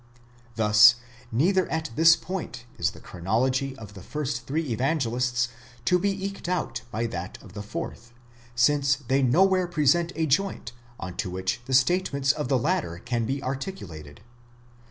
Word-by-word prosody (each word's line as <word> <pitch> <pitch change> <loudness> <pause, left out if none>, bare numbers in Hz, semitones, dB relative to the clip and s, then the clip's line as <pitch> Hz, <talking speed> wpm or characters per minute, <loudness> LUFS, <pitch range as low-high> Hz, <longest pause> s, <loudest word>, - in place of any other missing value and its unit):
Thus 105 +1 +7 0.4
neither 180 - +2
at 160 -3 -2
this 165 0 +7
point 160 -12 -6
is 85 -1 +2
the - - -13
chronology 130 +9 -1
of 105 -4 -10
the 95 - -10
first 130 0 -4
three 150 -2 -1
Evan 135 +8 +1
gelists 125 -2 0 0.4
to 180 0 +3
be 195 +1 -1
eked 195 -3 -5
out 180 -2 -2
by 115 +1 -2
that 90 -5 -5
of 100 - -14
the 105 - -6
fourth, 115 +3 -6 0.4
since 140 +3 +3
they 135 0 0
nowhere 185 +8 +3
present 170 +1 +2
a 160 - 0
joint 155 -4 0 0.3
on 90 +1 -7
to - - -2
which 95 +4 -2
the 130 - 0
statements 140 -1 +3
of 150 -2 -3
the 130 - +2
latter 150 - -1
can 115 +3 -2
be 135 +2 -2
articulated. 130 - -6
130 Hz, 160 wpm, -26 LUFS, 115-160 Hz, 0.4 s, Thus